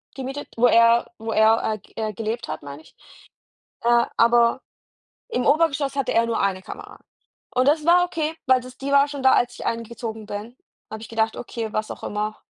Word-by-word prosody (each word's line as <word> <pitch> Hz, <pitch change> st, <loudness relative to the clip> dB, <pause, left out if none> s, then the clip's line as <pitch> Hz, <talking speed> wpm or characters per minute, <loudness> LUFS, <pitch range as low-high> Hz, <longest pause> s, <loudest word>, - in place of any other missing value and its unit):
gemietet 270 Hz, +2 st, -6 dB
wo 245 Hz, +1 st, +5 dB
er 230 Hz, 0 st, +4 dB
wo 225 Hz, 0 st, -5 dB
er, 220 Hz, +1 st, +4 dB
äh, -, -, -9 dB
ge -, -, -24 dB, 0.2 s
äh, -, -, -6 dB
gelebt 225 Hz, +3 st, -4 dB
hat, -, -, -5 dB
meine 145 Hz, +1 st, -9 dB
ich. -, -, -21 dB, 0.9 s
Äh, 235 Hz, 0 st, +3 dB
aber 235 Hz, +2 st, +4 dB, 0.7 s
im 250 Hz, -, -1 dB
Obergeschoss 285 Hz, -2 st, +2 dB
hatte 275 Hz, -, 0 dB
er 230 Hz, 0 st, +3 dB
nur 230 Hz, -1 st, -1 dB
eine 190 Hz, -1 st, 0 dB
Kamera. -, -, -10 dB, 0.5 s
Und 255 Hz, +1 st, +2 dB
das 300 Hz, 0 st, +2 dB
war 355 Hz, +1 st, +5 dB
okay, 320 Hz, -3 st, -3 dB
weil 260 Hz, -1 st, +4 dB
das 255 Hz, +1 st, -12 dB
die 280 Hz, +1 st, -4 dB
war 280 Hz, +1 st, +5 dB
schon 280 Hz, -2 st, -6 dB
da, 265 Hz, -, +6 dB
als 240 Hz, -, +2 dB
ich -, -, -8 dB
eingezogen 230 Hz, -1 st, -5 dB
bin 210 Hz, +5 st, -7 dB, 0.3 s
habe 220 Hz, 0 st, -7 dB
ich -, -, -9 dB
gedacht: 225 Hz, 0 st, 0 dB
„Okay, 230 Hz, -2 st, -5 dB
was 215 Hz, 0 st, -2 dB
auch -, -, -8 dB
immer, 210 Hz, +1 st, -3 dB
235 Hz, 200 wpm, -23 LUFS, 220-275 Hz, 0.9 s, da